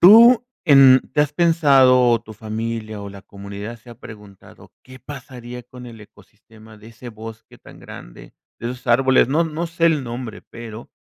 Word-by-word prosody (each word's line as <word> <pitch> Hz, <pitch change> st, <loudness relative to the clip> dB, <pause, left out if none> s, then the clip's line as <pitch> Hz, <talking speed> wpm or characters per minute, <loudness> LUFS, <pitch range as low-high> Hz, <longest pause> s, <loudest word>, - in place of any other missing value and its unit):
tú 230 Hz, +6 st, +7 dB, 0.2 s
en, 135 Hz, -3 st, +7 dB
¿te 150 Hz, -, +4 dB
has 150 Hz, 0 st, -4 dB
pensado, 135 Hz, -7 st, +4 dB
o 115 Hz, -1 st, +1 dB
tu 110 Hz, -2 st, -13 dB
familia 110 Hz, 0 st, -6 dB
o 100 Hz, -, -8 dB
la 100 Hz, 0 st, -12 dB
comunidad 100 Hz, +3 st, -9 dB
se 115 Hz, -, -21 dB
ha 120 Hz, -, -11 dB
preguntado, 105 Hz, -3 st, -15 dB
qué 130 Hz, 0 st, -15 dB
pasaría 125 Hz, -3 st, -10 dB
con 125 Hz, +1 st, -13 dB
el 115 Hz, -2 st, -12 dB
ecosistema 110 Hz, +1 st, -19 dB
de 105 Hz, +1 st, -15 dB
ese 115 Hz, +2 st, -12 dB
bosque 110 Hz, 0 st, -12 dB
tan -, -, -17 dB
grande, -, -, -13 dB, 0.2 s
de 120 Hz, +1 st, -5 dB
esos 125 Hz, 0 st, -11 dB
árboles? 130 Hz, +1 st, +3 dB
No 155 Hz, +5 st, +1 dB
no 165 Hz, +1 st, -4 dB
sé 165 Hz, 0 st, 0 dB
el 155 Hz, -5 st, +1 dB
nombre, 120 Hz, -2 st, -8 dB
pero 115 Hz, -1 st, -11 dB
120 Hz, 180 wpm, -20 LUFS, 110-135 Hz, 0.2 s, tú